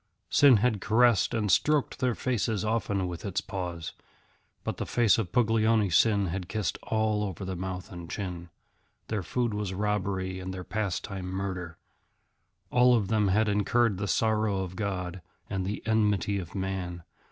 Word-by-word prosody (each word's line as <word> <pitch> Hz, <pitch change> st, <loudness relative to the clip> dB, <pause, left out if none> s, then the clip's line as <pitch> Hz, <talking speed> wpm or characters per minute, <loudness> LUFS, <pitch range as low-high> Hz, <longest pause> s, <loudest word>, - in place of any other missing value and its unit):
Sin 140 Hz, -5 st, +7 dB
had 110 Hz, -2 st, +1 dB
caressed 115 Hz, -1 st, +4 dB
and 110 Hz, -4 st, 0 dB
stroked 150 Hz, -2 st, +2 dB
their 125 Hz, -2 st, +1 dB
faces 110 Hz, -4 st, -1 dB
often 100 Hz, -4 st, 0 dB
with 85 Hz, -1 st, -6 dB
its 100 Hz, -1 st, -1 dB
paws, 90 Hz, -6 st, -5 dB, 0.7 s
but -, -, -3 dB
the -, -, -3 dB
face 115 Hz, -2 st, +3 dB
of 95 Hz, -6 st, -3 dB
Puglioni 110 Hz, -2 st, +3 dB
Sin 100 Hz, +2 st, +4 dB
had 90 Hz, +1 st, -4 dB
kissed 105 Hz, -7 st, -2 dB
all 110 Hz, -1 st, 0 dB
over 95 Hz, -1 st, -4 dB
the 95 Hz, 0 st, -3 dB
mouth 90 Hz, +2 st, -5 dB
and 85 Hz, -2 st, -8 dB
chin. 90 Hz, -4 st, -5 dB, 0.6 s
Their 105 Hz, -2 st, -1 dB
food 120 Hz, +5 st, -1 dB
was 105 Hz, -2 st, -3 dB
robbery 95 Hz, -2 st, -1 dB
and 95 Hz, 0 st, -5 dB
their 95 Hz, -1 st, -6 dB
pastime 95 Hz, -1 st, -3 dB
murder. 90 Hz, -3 st, -4 dB, 0.9 s
All 125 Hz, 0 st, +5 dB
of 105 Hz, -5 st, 0 dB
them 110 Hz, -2 st, +2 dB
had 105 Hz, +3 st, +3 dB
incurred 105 Hz, 0 st, +2 dB
the 100 Hz, -, -2 dB
sorrow 110 Hz, +1 st, +1 dB
of 90 Hz, 0 st, -7 dB
God 95 Hz, -3 st, -3 dB, 0.3 s
and 95 Hz, -1 st, -2 dB
the 105 Hz, -, -4 dB
enmity 105 Hz, -3 st, +1 dB
of 90 Hz, -, -8 dB
man. 95 Hz, -3 st, -3 dB
100 Hz, 165 wpm, -28 LUFS, 95-110 Hz, 0.9 s, Sin